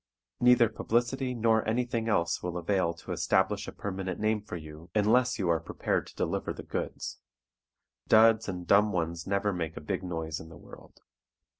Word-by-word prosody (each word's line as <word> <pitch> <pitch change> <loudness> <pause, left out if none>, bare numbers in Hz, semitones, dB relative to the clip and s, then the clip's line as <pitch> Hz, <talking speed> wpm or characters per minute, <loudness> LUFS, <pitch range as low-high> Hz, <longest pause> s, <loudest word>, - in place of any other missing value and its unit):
Neither 125 -1 +6
publicity 120 +4 -1
nor 110 -1 +3
anything 115 -1 -1
else 85 -5 +1
will 90 0 -3
avail 90 -1 0
to 85 - -9
establish 95 +4 +1
a - - -5
permanent 95 -2 -4
name 110 0 +1
for 100 - -7
you 80 +1 -11
unless 120 +4 +3
you 95 - -1
are 85 -1 +3
prepared 80 - -2
to - - -14
deliver - - -2
the - - -9
goods. - - -5 0.9
Duds 110 -1 +5
and 90 -2 -5
dumb 105 +4 +4
ones 85 -2 -2
never 100 +1 +1
make 80 -2 -4
a - - -3
big 75 - -3
noise 80 -3 -4
in 80 - -11
the 85 - -12
world. - - -15
100 Hz, 175 wpm, -29 LUFS, 85-110 Hz, 0.9 s, Neither